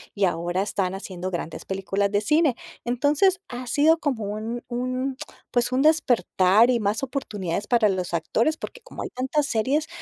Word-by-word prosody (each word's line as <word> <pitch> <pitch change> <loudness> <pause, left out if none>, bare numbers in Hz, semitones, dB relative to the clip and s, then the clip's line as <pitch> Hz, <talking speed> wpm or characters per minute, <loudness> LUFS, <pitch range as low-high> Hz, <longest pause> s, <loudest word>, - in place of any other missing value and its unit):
y 200 - -1
ahora 175 0 0
están 195 -2 -1
haciendo 185 -2 -5
grandes 170 -3 -5
películas 195 +1 -1
de 205 +1 +1
cine, 300 +3 +3 0.3
entonces, 295 +10 +2
ha 250 0 -6
sido 310 +6 +4
como 260 -9 -1
un 215 +4 -4
un, 255 +2 -2 0.3
pues, 245 0 +1
un 260 - +2
despertar 240 -8 +4
y 245 -2 +3
más 210 +5 -1
oportunidades 205 -9 -3
para 235 -4 +4
los 185 -2 -2
actores, 230 - +1
porque - - -8
como - - -8
hay - - -5
tantas 265 +4 -1
series, 270 +8 0
235 Hz, 170 wpm, -24 LUFS, 195-270 Hz, 0.3 s, sido